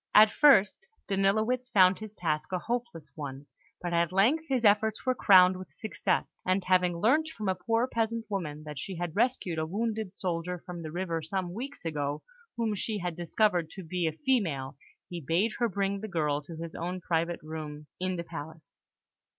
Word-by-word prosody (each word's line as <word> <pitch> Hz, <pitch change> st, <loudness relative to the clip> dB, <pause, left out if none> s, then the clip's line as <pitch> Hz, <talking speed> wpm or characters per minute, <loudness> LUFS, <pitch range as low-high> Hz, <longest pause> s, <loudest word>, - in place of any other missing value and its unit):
At 215 Hz, 0 st, +9 dB
first, 290 Hz, -, +4 dB, 0.2 s
Danilowitz 215 Hz, +6 st, +1 dB
found 185 Hz, -3 st, +5 dB
his 215 Hz, -1 st, -7 dB
task 155 Hz, -3 st, -2 dB
a 185 Hz, -, +1 dB
hopeless 230 Hz, -7 st, -4 dB
one; 140 Hz, -2 st, -7 dB, 0.4 s
but 175 Hz, -1 st, -2 dB
at 170 Hz, 0 st, +2 dB
length 240 Hz, +13 st, +3 dB
his 255 Hz, -4 st, +1 dB
efforts 215 Hz, +2 st, +3 dB
were 255 Hz, -, +3 dB
crowned 185 Hz, -5 st, +6 dB
with 185 Hz, -, -9 dB
success, 220 Hz, -, -1 dB, 0.2 s
and 185 Hz, +1 st, +1 dB
having 180 Hz, -2 st, +2 dB
learnt 265 Hz, -, +3 dB
from 215 Hz, -10 st, -5 dB
a 190 Hz, -, +3 dB
poor 225 Hz, +6 st, 0 dB
peasant 230 Hz, -1 st, -1 dB
woman 160 Hz, -7 st, -4 dB
that 150 Hz, -2 st, -7 dB
she 190 Hz, +6 st, -5 dB
had 175 Hz, -1 st, -4 dB
rescued 215 Hz, -8 st, +1 dB
a 160 Hz, -, 0 dB
wounded 215 Hz, +1 st, -2 dB
soldier 180 Hz, -1 st, -2 dB
from 175 Hz, -2 st, -6 dB
the 155 Hz, -1 st, -6 dB
river 170 Hz, -1 st, -2 dB
some 175 Hz, +2 st, -3 dB
weeks 260 Hz, +1 st, -7 dB
ago, 145 Hz, -2 st, -2 dB, 0.3 s
whom 225 Hz, -2 st, 0 dB
she 210 Hz, +2 st, -2 dB
had 180 Hz, -3 st, -3 dB
since 175 Hz, -1 st, -7 dB
discovered 180 Hz, -7 st, +2 dB
to 190 Hz, -, -9 dB
be 175 Hz, +1 st, -1 dB
a -, -, +1 dB
female, 160 Hz, -, -1 dB, 0.3 s
he 175 Hz, -1 st, -6 dB
bade 170 Hz, +10 st, +1 dB
her 235 Hz, -1 st, +2 dB
bring 200 Hz, 0 st, -1 dB
the 220 Hz, -, -4 dB
girl 150 Hz, -6 st, 0 dB
to 160 Hz, +3 st, -10 dB
his 165 Hz, 0 st, -7 dB
own 180 Hz, +2 st, -4 dB
private 170 Hz, -1 st, -1 dB
room 155 Hz, -1 st, -7 dB
in 185 Hz, 0 st, -1 dB
the 170 Hz, -, -3 dB
palace. 160 Hz, -1 st, -10 dB
185 Hz, 190 wpm, -29 LUFS, 165-215 Hz, 0.4 s, At